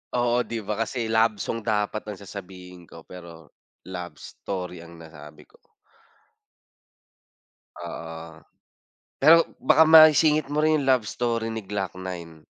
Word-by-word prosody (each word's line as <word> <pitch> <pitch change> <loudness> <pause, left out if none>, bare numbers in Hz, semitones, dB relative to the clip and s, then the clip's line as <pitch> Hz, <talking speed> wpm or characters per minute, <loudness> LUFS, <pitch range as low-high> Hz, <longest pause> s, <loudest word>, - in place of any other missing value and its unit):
Oo 120 0 +1
'di 115 -2 -4
ba 105 +2 -4
kasi 115 -1 -3
love 110 -1 +2
song 115 +3 -4
dapat 110 -1 -2
ang 105 - -6
sasabihin 90 -3 -11
ko - - -14
pero 85 -3 -13 0.4
love 90 -4 -7
story 90 +2 -7
ang 85 0 -13
nasabi 80 -2 -14
ko. - - -27 2.3
Oo. 80 -1 -9 0.8
Pero 165 +4 +6 0.2
baka 160 - +4
maisingit 155 -2 +6
mo 150 +1 -1
rin 155 -1 +2
'yong 135 - -3
love 130 -4 +3
story 115 -2 -2
ni 110 -1 -5
Glock-9. 95 -5 -7
105 Hz, 130 wpm, -24 LUFS, 85-120 Hz, 2.3 s, Pero